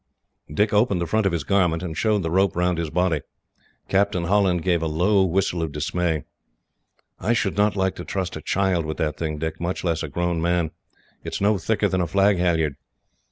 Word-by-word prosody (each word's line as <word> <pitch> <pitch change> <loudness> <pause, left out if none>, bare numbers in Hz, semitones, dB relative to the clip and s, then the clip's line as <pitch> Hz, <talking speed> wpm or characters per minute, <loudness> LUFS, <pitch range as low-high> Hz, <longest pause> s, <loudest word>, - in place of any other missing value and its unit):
Dick 105 +8 +1
opened 105 -3 +3
the 85 - -1
front 110 +3 +1
of - - +1
his 85 -4 -2
garment, 90 0 +1
and 80 -3 -4
showed 105 -1 +1
the 80 - -2
rope 95 0 +2
round 90 -1 +1
his 80 -2 -2
body. 85 -2 +1 0.7
Captain 95 -2 +1
Holland 90 -2 +2
gave 85 -3 +1
a 80 - 0
low 95 +6 +3
whistle 90 -1 0
of 80 -2 -2
dismay. 80 +1 -1 1.0
"I 110 +7 +1
should 105 -5 0
not 105 +1 +2
like 95 -1 +1
to - - -6
trust 95 -2 -3
a - - -6
child 95 -3 +1
with 80 0 -4
that 75 -2 -1
thing, 80 -2 -3
Dick, 80 +1 -4
much 85 +2 -2
less 85 -3 0
a 80 - -3
grown 85 +2 -1
man. 85 -1 +1 0.5
It - - -5
is - - -2
no 100 0 +3
thicker 105 +4 +1
than 95 -1 0
a 85 - 0
flag 100 +2 +3
halliard." 80 -5 +1
90 Hz, 210 wpm, -23 LUFS, 80-100 Hz, 1.0 s, opened